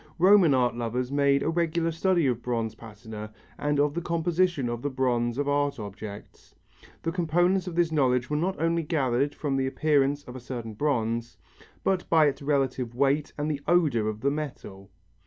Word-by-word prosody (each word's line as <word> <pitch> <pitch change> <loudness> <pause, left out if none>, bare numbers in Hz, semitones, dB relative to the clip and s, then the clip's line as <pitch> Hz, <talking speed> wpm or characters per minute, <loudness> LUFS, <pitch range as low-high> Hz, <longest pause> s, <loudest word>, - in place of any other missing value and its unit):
Roman 180 -4 +6
art 125 -2 +2
lovers 120 +2 -2
made 140 -1 +3
a - - 0
regular 165 0 0
study 170 0 +1
of 120 -3 0
bronze 115 -3 -2
patina 110 -1 -9 0.3
and 145 -1 0
of 145 0 +2
the 170 - -2
composition 170 -3 0
of 120 0 -3
the 145 - -1
bronze 120 -3 0
of 145 0 -1
art 145 0 +1
objects. 105 -1 -9 0.5
The 165 - -1
components 175 +2 +1
of 175 - -5
this 170 -2 +2
knowledge 125 -5 +2
were 150 - -2
not 180 +5 -1
only 165 +1 +1
gathered 140 -4 0
from 140 -3 -2
the 130 0 0
appearance 145 0 +1
of 125 - -10
a - - -6
certain 120 -3 -6
bronze, 115 -2 -1 0.5
but 190 -2 0
by 160 -2 +5
its 145 -1 0
relative 135 -4 -1
weight 140 +3 +1
and 150 0 -2
the 145 -2 -4
odour 150 -11 +3
of 110 0 -4
the 140 - +1
metal. 115 -10 -6
140 Hz, 185 wpm, -27 LUFS, 120-160 Hz, 0.5 s, Roman